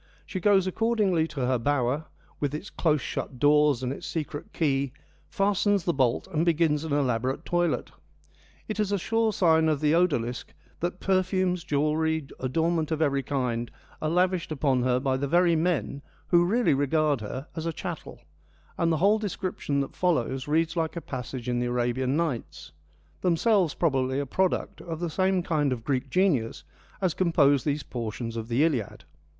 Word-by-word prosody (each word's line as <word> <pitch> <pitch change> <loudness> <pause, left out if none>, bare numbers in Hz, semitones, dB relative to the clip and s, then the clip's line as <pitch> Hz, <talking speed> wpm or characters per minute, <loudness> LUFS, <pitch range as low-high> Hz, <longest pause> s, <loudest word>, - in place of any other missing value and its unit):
She 185 - -4
goes 195 0 +4
accordingly 195 -5 +1
to 150 -4 -6
her 125 -1 +1
bower, 140 +3 0 0.3
with 145 0 -1
its 175 +6 -7
close 155 -4 +1
shut 130 - -5
doors 145 -1 +4
and 125 +1 -1
its - - -8
secret 150 -2 -5
key, 140 -4 0 0.4
fastens 200 -1 +1
the 170 - +1
bolt, 130 -5 +1
and 160 +1 +2
begins 160 -3 +2
an 160 - -5
elaborate 130 +1 0
toilet. 175 -1 0 0.8
It 215 -1 -4
is 210 -2 0
a 200 - +2
sure 225 +4 +1
sign 160 -5 +3
of 150 -2 +1
the 150 +1 +2
odalisque 140 -9 0 0.2
that 175 +2 -3
perfumes, 185 -2 +1
jewellery, 155 0 0
adornment 160 +4 0
of 160 -2 -1
every 140 -3 +2
kind 125 -4 -2 0.3
are 155 - 0
lavished 180 0 +1
upon 135 -4 +1
her 125 0 +2
by 130 0 0
the 140 +1 -2
very 175 +2 +4
men 155 - -1 0.3
who 175 -1 +5
really 225 0 +2
regard 145 -1 +1
her 130 +6 -5
as 160 0 -3
a - - 0
chattel, - - -7 0.6
and 170 -1 +2
the 160 - +2
whole 205 +6 +3
description 185 -8 -2
that 135 - -5
follows 135 -7 0
reads 165 +2 +1
like 165 -1 -1
a - - -2
passage 125 -2 -6
in 120 -1 0
the 120 - -1
Arabian 125 +3 0
Nights, 150 - -3 0.5
themselves 180 -1 +2
probably 135 -4 +1
a 140 - -1
product 185 +7 -1
of 165 -2 -6
the 170 -2 -3
same 185 +1 +1
kind 150 -5 +1
of 120 -3 -3
Greek 135 +1 -1
genius 150 - +1 0.4
as 185 -4 +1
composed 145 -7 +3
these 145 -1 0
portions 115 -1 -5
of 115 -1 -4
the 120 +5 +2
Iliad. 130 - -1
155 Hz, 175 wpm, -27 LUFS, 130-175 Hz, 0.8 s, who